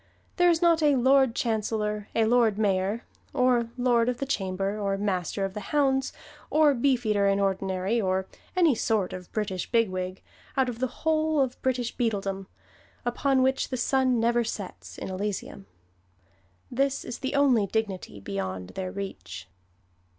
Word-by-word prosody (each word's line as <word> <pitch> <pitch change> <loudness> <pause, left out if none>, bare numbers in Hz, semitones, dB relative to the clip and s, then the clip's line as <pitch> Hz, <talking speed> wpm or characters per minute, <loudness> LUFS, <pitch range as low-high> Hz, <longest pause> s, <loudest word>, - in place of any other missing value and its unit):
There 355 -1 +5
is 335 0 +2
not 335 -1 +4
a 295 -2 +4
Lord 260 -1 +4
Chancellor, 215 -2 -1
or 225 - +3
Lord 225 -2 +3
Mayor, 200 +1 0 0.3
or 250 -3 +3
Lord 245 -1 +3
of 250 - -2
the 275 - -3
Chamber, 195 -5 -1
or 200 -1 0
Master 195 -1 -1
of 195 - -5
the 210 - -4
Hounds, 270 -2 +2 0.4
or 305 -1 +5
Beefeater 235 -6 +2
in 195 0 +2
Ordinary, 195 +2 0
or 190 -1 0 0.3
any 340 -5 +5
sort 215 -4 0
of 180 -1 -8
British 195 -4 -3
bigwig, 185 -5 0 0.3
out 265 -1 +3
of 235 -1 -6
the 260 - +1 0.2
whole 315 -1 +2
of 260 -2 0
British 250 -2 -1
Beadledom, 195 -5 -2 0.6
upon 260 +2 +2
which 265 0 +1
the 255 - -2
sun 255 0 +2
never 235 +1 +2
sets, 205 -4 -7
in - - -5
Elysium. 190 - -4 1.0
This 275 +2 0
is 240 - -6
the 265 +2 -3
only 255 -8 +4
dignity 195 - -3
beyond 95 -2 -4
their 185 -1 -5
reach." 95 - -7
225 Hz, 155 wpm, -27 LUFS, 195-260 Hz, 1.0 s, There